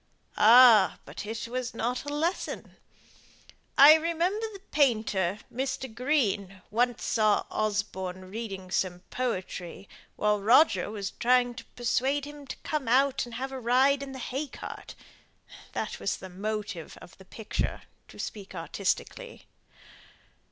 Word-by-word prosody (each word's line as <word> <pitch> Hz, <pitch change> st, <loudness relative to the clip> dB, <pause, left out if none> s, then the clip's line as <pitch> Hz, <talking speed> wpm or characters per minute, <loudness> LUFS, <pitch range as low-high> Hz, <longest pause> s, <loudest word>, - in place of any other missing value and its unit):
"Ah! 225 Hz, -4 st, +7 dB
but 210 Hz, -, -8 dB
it 220 Hz, 0 st, -4 dB
was 250 Hz, 0 st, -4 dB
not 245 Hz, +4 st, -2 dB
a -, -, -4 dB
lesson. 320 Hz, +5 st, -3 dB, 1.0 s
I 285 Hz, +3 st, +10 dB
remember 340 Hz, +7 st, 0 dB
the 395 Hz, -2 st, -11 dB
painter, 215 Hz, -, +1 dB, 0.2 s
Mr. 260 Hz, -1 st, -3 dB
Green, 210 Hz, -8 st, -1 dB
once 245 Hz, +2 st, +1 dB
saw 215 Hz, -2 st, +2 dB
Osborne 190 Hz, -3 st, -3 dB
reading 195 Hz, -4 st, -6 dB
some 180 Hz, -2 st, -1 dB
poetry, 190 Hz, -6 st, -4 dB, 0.3 s
while 210 Hz, -1 st, +1 dB
Roger 220 Hz, -, +4 dB
was 205 Hz, -2 st, -4 dB
trying 245 Hz, 0 st, +2 dB
to 245 Hz, -, -10 dB
persuade 265 Hz, +4 st, 0 dB
him 290 Hz, -1 st, -11 dB
to -, -, -5 dB
come 300 Hz, -5 st, -2 dB
out 270 Hz, +3 st, +3 dB
and 235 Hz, -, -9 dB
have 265 Hz, +2 st, -4 dB
a 265 Hz, -, -5 dB
ride 260 Hz, +4 st, +3 dB
in 275 Hz, -1 st, -6 dB
the 265 Hz, -, -7 dB
hay 265 Hz, +4 st, -4 dB
cart -, -, -9 dB, 0.8 s
that -, -, -4 dB
was -, -, -1 dB
the 190 Hz, -, -10 dB
'motive' 200 Hz, -3 st, -5 dB
of -, -, -14 dB
the 190 Hz, -, -14 dB
picture, 220 Hz, +2 st, -4 dB, 0.2 s
to -, -, -15 dB
speak 200 Hz, -3 st, -7 dB
artistically. 200 Hz, -, -3 dB
235 Hz, 135 wpm, -28 LUFS, 200-270 Hz, 1.0 s, I